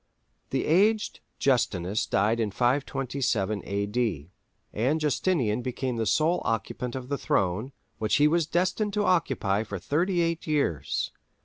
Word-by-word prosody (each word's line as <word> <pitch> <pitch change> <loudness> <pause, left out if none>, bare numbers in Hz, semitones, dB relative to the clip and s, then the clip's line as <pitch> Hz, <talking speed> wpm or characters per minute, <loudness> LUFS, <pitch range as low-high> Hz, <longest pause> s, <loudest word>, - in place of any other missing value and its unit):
The - - -1
aged 210 +7 +2 0.2
Justinus 105 -7 +1
died 110 +3 +2
in 110 -2 +1
527 125 -3 0
A.D., 100 - -2 0.4
and 130 +9 +1
Justinian 145 - +1
became 125 0 -3
the 110 -1 -1
sole 160 - +2
occupant 115 +3 -2
of 130 -1 -5
the 140 +1 -2
throne, 110 - 0 0.3
which 110 -1 +1
he 150 - +5
was 165 0 +2
destined 185 +5 0
to 205 0 +1
occupy 130 - +1
for 100 -3 -5
thirty 170 - 0
eight 165 0 -1
years. 140 - 0
130 Hz, 135 wpm, -27 LUFS, 105-160 Hz, 0.4 s, he